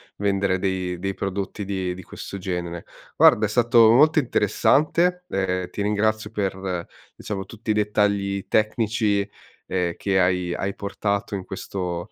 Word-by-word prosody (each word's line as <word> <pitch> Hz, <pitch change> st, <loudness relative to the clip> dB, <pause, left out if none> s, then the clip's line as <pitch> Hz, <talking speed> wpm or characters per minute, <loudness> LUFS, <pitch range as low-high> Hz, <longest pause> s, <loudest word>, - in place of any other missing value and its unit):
vendere 100 Hz, -2 st, 0 dB
dei 95 Hz, -2 st, -2 dB
dei 95 Hz, +2 st, -3 dB
prodotti 100 Hz, +1 st, -4 dB
di 95 Hz, -2 st, -2 dB
di 95 Hz, +1 st, -10 dB
questo 100 Hz, -, -8 dB
genere. 90 Hz, -2 st, -4 dB, 0.3 s
Guarda, -, -, +6 dB
è -, -, -9 dB
stato 115 Hz, -1 st, +5 dB
molto 155 Hz, +6 st, +5 dB
interessante, 155 Hz, -, +2 dB
ehm, 90 Hz, -, -1 dB
ti -, -, -4 dB
ringrazio 105 Hz, +1 st, 0 dB
per, 95 Hz, -4 st, -3 dB, 0.3 s
diciamo, 100 Hz, -2 st, -4 dB
tutti 110 Hz, 0 st, -5 dB
i -, -, +3 dB
dettagli 100 Hz, -2 st, 0 dB
tecnici, 110 Hz, -2 st, +1 dB, 0.4 s
ehm, 90 Hz, -2 st, -1 dB
che 95 Hz, -2 st, +1 dB
hai 90 Hz, -1 st, +1 dB
hai 95 Hz, +2 st, -2 dB
portato 100 Hz, +1 st, -2 dB
in 95 Hz, -, -4 dB
questo 90 Hz, -2 st, -5 dB
100 Hz, 145 wpm, -23 LUFS, 95-105 Hz, 0.4 s, Guarda